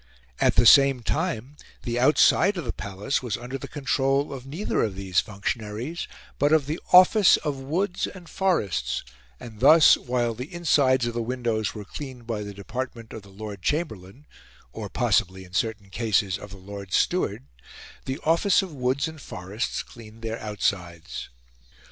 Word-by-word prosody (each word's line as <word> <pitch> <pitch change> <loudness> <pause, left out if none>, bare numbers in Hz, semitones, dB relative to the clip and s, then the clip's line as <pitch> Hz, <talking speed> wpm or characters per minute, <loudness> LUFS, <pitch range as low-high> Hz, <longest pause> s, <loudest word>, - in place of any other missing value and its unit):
At - - +3
the - - +5
same 135 -3 +7
time, 145 -3 -2 0.3
the 120 -1 -2
outside 160 +8 +4
of 170 - -4
the 115 - -3
Palace 100 +6 -3
was 120 -5 -3
under 125 +3 -6
the - - -7
control 140 0 0
of 135 -1 -8
neither 165 +10 -2
of 105 -4 -1
these 95 -1 0
functionaries 110 +8 -4 0.3
but 145 +2 +3
of 155 -3 +4
the 155 +4 -3
Office 185 +2 +7
of 145 -3 -3
Woods 180 +8 -1
and 180 -3 -11
Forests; 175 - -1 0.4
and 110 -3 -11
thus, 155 +2 +7
while 120 -2 -1
the 125 +8 -8
insides 140 -7 +2
of 120 - -2
the 120 - -2
windows 115 -3 -2
were 105 -1 -7
cleaned 130 0 -8
by 115 -2 -3
the 100 0 -6
Department 115 +3 -6
of 110 - -7
the 100 - -17
Lord 100 0 -8
Chamberlain 135 - -3 0.5
or - - -6
possibly, 95 +1 +1
in 90 - -18
certain 105 -1 -2
cases, 105 -4 0
of 105 - -10
the 100 - -11
Lord 100 -1 -9
Steward - - +1 0.6
the 130 +1 -3
Office 170 +5 +3
of 185 -4 -8
Woods 130 +2 0
and 160 -2 -9
Forests 95 +4 -4
cleaned 115 -1 -14
their 115 0 -3
outsides. 90 -6 -3
120 Hz, 165 wpm, -25 LUFS, 105-145 Hz, 0.6 s, same